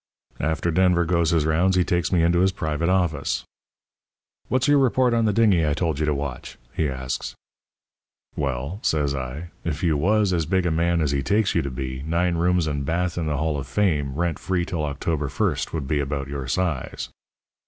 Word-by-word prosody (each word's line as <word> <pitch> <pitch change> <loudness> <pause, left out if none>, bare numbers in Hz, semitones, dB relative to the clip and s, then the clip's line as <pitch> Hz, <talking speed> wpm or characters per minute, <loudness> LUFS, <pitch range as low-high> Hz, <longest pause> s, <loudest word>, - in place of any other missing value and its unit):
"After 80 +3 0
Denver 90 0 +3
goes 85 -1 +2
his 80 -3 +2
rounds 85 +4 +2
he 90 - +4
takes 85 -2 0
me 85 -3 +3
into 85 +1 +3
his 95 +1 +3
private 80 0 -2
office. 85 -6 0 1.0
"'What's 130 +2 +1
your 145 -1 +5
report 130 -1 +3
on 115 -1 +2
the 105 - +3
dingy 100 -5 +3
I 75 -2 +1
told 80 -4 -1
you 75 - 0
to 75 - +2
watch?' 70 -2 -5 0.2
he 80 -3 0
asks. 65 -1 -4 1.0
"'Well,' 70 +6 -3
says 75 -3 +1
I, 70 +5 -5
'if 80 -1 -3
you 80 -3 +3
was 100 +5 +2
as 85 -4 0
big 95 +1 +1
a 85 - +1
man 85 +1 +1
as 75 -3 +1
he 70 -1 0
takes 100 +7 +1
you 85 - +2
to 70 - -3
be, 65 0 -5
nine 85 +4 0
rooms 90 0 +2
and 70 -2 -2
bath 85 +3 -1
in 85 -3 -2
the 75 -1 -1
Hall 75 -1 -1
of 65 - -6
Fame, 75 -4 0
rent 85 +1 -1
free 90 -2 -1
till 85 -4 -3
October 75 +1 -2
1st, 65 - -1
would 75 -5 -3
be 75 +1 0
about 70 0 -2
your 70 -2 -5
size.' 80 -2 -2
80 Hz, 205 wpm, -24 LUFS, 70-90 Hz, 1.0 s, your